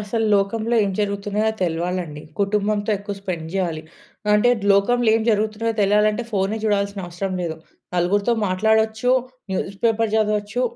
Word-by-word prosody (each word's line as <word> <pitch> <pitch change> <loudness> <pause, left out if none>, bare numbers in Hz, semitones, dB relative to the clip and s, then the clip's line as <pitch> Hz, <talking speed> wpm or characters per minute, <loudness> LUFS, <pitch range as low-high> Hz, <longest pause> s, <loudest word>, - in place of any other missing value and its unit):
అసలు 220 +2 -1
లోకంలో 220 +4 0
ఏం 200 - -1
జరుగుతున్నాయో 205 +1 -1
తెలవాలండి. 170 -2 -2 0.2
కుటుంబంతో 205 +1 0
ఎక్కువ 200 +1 -6
స్పెండ్ 180 -5 -4
జేయాలి. 170 -5 -1 0.5
అంటే 210 +4 +4 0.2
లోకంలో 240 +4 +3
ఏం 225 - -1
జరుగుతున్నాయో 215 +1 0
తెలియాలంటే 210 +3 +2
ఫోనే 200 +2 0
చూడాల్సిన 200 -1 0
అవసరం 185 +2 -4
లేదు. 160 -2 -3 0.4
నలుగురితో 200 +6 +2
మాట్లాడొచ్చు. 220 +5 +2 0.4
News 195 +1 -3
paper 225 -1 +2
జదవచ్చు. 215 +2 0
205 Hz, 130 wpm, -22 LUFS, 195-220 Hz, 0.5 s, అంటే